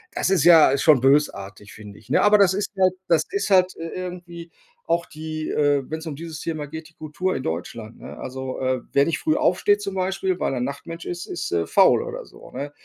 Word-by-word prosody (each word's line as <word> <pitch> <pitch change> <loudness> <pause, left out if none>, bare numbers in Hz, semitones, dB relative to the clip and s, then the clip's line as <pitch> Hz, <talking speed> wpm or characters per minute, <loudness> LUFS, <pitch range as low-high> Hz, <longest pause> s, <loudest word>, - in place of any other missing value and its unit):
Das - - 0
ist 185 -6 +3
ja 160 -5 +7
schon 150 -5 +5
bösartig, 105 -8 0
finde 105 -1 -12
ich, - - -22
ne? - - +3
Aber 210 0 +5
das 190 -2 +4
ist 205 0 -3
halt 185 -1 +4
das 165 -2 +2
ist 400 - -2
halt 185 -1 +4
i - - -7
irgendwie 175 -2 -7 0.4
auch 170 0 +1
die 155 0 -6
äh, 145 -2 +1
wenn's 160 +1 -5
um 150 - -5
dieses 160 +1 -8
Thema 155 -3 -4
geht, 160 +2 -9
die - - -23
Kultur 160 +5 -3
in 130 - -4
Deutschland, 110 +7 -6
ne? - - -10
Also, 130 0 -6
äh, 130 -1 0
wer 140 - +5
nicht 155 0 -1
früh 155 - +1
aufsteht 205 +3 +2
zum 195 -1 -5
Beispiel, 190 0 -1
weil - - -1
er 125 - -2
Nachtmensch 165 +6 -6
ist, 175 0 -5
ist, 175 - -5
äh, 85 -1 0
faul - - +4
oder - - -6
so, - - -16
ne? 145 +1 -6
160 Hz, 225 wpm, -23 LUFS, 140-180 Hz, 0.4 s, ja